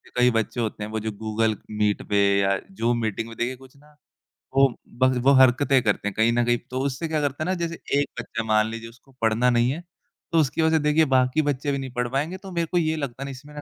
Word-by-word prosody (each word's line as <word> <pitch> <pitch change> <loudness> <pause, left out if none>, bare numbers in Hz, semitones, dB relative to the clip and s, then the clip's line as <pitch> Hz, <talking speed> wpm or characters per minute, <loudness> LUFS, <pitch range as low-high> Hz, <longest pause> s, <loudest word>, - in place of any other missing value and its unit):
कई 125 0 +4
बच्चे 115 +1 -1
होते 110 -1 -3
हैं 105 - -5
वो 110 - -2
जो 110 +1 -3
गूगल 110 0 0 0.2
मीट 105 -1 0
पे 105 - +2 0.2
या 100 0 +2 0.2
ज़ूम 120 +1 +1
मीटिंग 110 0 -2
में 115 - -10
देखिए 120 +2 -1
कुछ 130 +1 -17
ना 150 +1 -22 0.6
वो 135 0 +6 0.3
ब 130 0 +5
वो 140 - +6
हरकतें 130 +1 +4
करते 105 -1 0
हैं 105 - -2
कहीं 110 +2 +3
न 120 0 +2
कहीं। 120 0 +2
तो 130 - -3
उससे 140 +4 -2
क्या 155 -1 -1
करता 145 +1 -2
है - - -3
ना - - +2
जैसे 170 -1 -4 0.2
एक 145 - 0
बच्चा 115 - -4
मान 110 0 +2
लीजिए 115 0 -7
उसको 125 +3 -21
पढ़ना 115 +2 +3
नहीं 120 0 +3
है 165 +5 -5 0.5
तो 165 - +3
उसकी 155 +1 +1
वजह 160 0 +3
से 155 - -2
देखिए 150 +1 +4
बाकी 130 +4 +3
बच्चे 145 -1 -1
भी 140 - -1
नहीं 135 -1 -5
पढ़ 125 0 -1
पाएँगे 150 +8 -2
तो 190 - -7
मेरे 170 -1 0
को 180 - +1
ये 160 -2 +1
लगता 135 -4 -5
है - - -5
ना 140 - -5
इसमें 140 +3 -12
ना 150 - -7
130 Hz, 265 wpm, -24 LUFS, 115-145 Hz, 0.6 s, वो